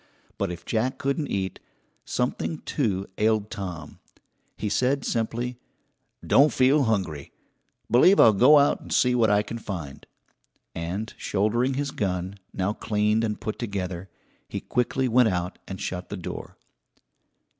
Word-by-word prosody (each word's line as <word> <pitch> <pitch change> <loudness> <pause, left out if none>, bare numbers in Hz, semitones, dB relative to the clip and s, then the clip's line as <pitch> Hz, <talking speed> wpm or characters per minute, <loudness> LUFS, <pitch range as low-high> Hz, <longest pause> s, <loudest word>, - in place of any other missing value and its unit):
But 100 -3 0
if 85 - -8
Jack 120 +3 0
couldn't 140 +2 -1
eat, 95 -2 -3 0.5
something, 130 +5 -2
too, 100 -9 -1
ailed 110 -1 +1
Tom. 90 -7 -6 0.6
He 105 - -3
said 130 +6 +1
simply: 120 +2 -2 0.7
"Don't 145 +2 +5
feel 135 +2 +4
hungry. 95 -10 -1 0.6
Believe 180 - +6
I'll 110 - +8
go 130 +9 +7
out 145 0 +3
and - - -11
see 125 0 +3
what 115 -3 +3
I 105 0 +3
can 115 +2 -6
find," 85 -10 -7 0.7
and 90 +7 -4
shouldering 120 +6 0
his 140 0 -2
gun, 95 -2 -3
now 95 +2 -1
cleaned 105 +1 +1
and 105 -2 -2
put 110 - -4
together, 95 -4 -4 0.4
he - - -3
quickly 125 +2 0
went 120 -1 +4
out 90 0 -3
and 95 -1 -6
shut 90 -1 -4
the - - -5
door. - - -7
110 Hz, 145 wpm, -25 LUFS, 95-125 Hz, 0.7 s, I'll